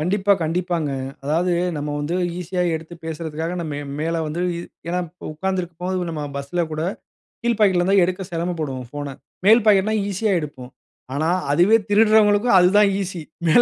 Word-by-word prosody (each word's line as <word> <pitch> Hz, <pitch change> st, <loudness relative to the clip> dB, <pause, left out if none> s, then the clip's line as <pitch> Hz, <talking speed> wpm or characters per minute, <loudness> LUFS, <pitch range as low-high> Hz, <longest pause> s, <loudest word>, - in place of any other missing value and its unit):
கண்டிப்பா, 195 Hz, +5 st, +2 dB
கண்டிப்பாங்க. 170 Hz, -1 st, -1 dB, 0.3 s
அதாவது, 170 Hz, +5 st, +1 dB, 0.2 s
நம்ம 145 Hz, 0 st, -3 dB
வந்து 150 Hz, +4 st, -2 dB, 0.2 s
ஈஸியா 180 Hz, +1 st, -2 dB
எடுத்து 160 Hz, +2 st, -6 dB
பேசுறதுக்காக 160 Hz, +1 st, -4 dB, 0.2 s
மே 145 Hz, -, -3 dB, 0.2 s
மேல 165 Hz, +2 st, -1 dB
வந்து 155 Hz, +3 st, -3 dB, 0.5 s
ஏன்னா 180 Hz, +1 st, 0 dB
இப்போ 180 Hz, +3 st, -12 dB
உக்காந்துருக்கும்போது 180 Hz, 0 st, -2 dB
நம்ம 155 Hz, -2 st, -4 dB
பஸ்ல 140 Hz, +5 st, -2 dB
கூட, 155 Hz, -, -2 dB, 0.6 s
கீழ் 235 Hz, -2 st, +1 dB
பாக்கெட்ல 190 Hz, -4 st, +4 dB
இருந்தா 195 Hz, +2 st, +3 dB
எடுக்க 185 Hz, +2 st, -3 dB
செரமப்படுவோம் 160 Hz, -7 st, -3 dB
ஃபோன. 145 Hz, 0 st, -6 dB, 0.3 s
மேல் 225 Hz, +3 st, +7 dB
பாக்கெட்னா 210 Hz, +1 st, +4 dB
ஈஸியா 200 Hz, +2 st, 0 dB
எடுப்போம். 135 Hz, -5 st, -8 dB, 0.4 s
ஆனா 155 Hz, +4 st, 0 dB, 0.2 s
அதுவே 180 Hz, +9 st, +5 dB
திருடுறவங்களுக்கும் 210 Hz, 0 st, +5 dB
அதுதான் 200 Hz, +3 st, +5 dB
ஈஸி 185 Hz, -3 st, -4 dB, 0.3 s
மேல 165 Hz, +10 st, +6 dB
175 Hz, 145 wpm, -22 LUFS, 155-195 Hz, 0.6 s, மேல்